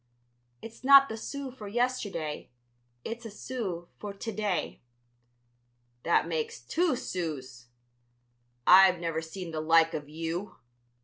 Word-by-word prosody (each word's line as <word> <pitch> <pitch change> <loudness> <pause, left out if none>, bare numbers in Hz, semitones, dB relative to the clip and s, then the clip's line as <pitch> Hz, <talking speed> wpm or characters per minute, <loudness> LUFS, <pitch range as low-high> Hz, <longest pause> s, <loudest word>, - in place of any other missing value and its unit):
"It's 230 +2 -11
not 275 +1 +8
the 220 - -4
sou 275 +4 -6
for 220 -5 -10
yesterday; 205 -9 -2 0.6
it's 230 +1 -5
a 225 - -7
sou 200 -6 -5
for 205 -1 -6
to 225 +3 -5
day." 205 -4 -2 1.2
"That 170 +2 +2
makes 160 -2 -3
two 320 - 0
sous! 140 - -5 1.0
I've 185 -1 +7
never 165 -1 -2
seen 165 +2 -7
the 155 -1 -3
like 165 +1 +4
of 145 -1 -5
you!" 165 +5 -4
185 Hz, 125 wpm, -29 LUFS, 160-230 Hz, 1.2 s, not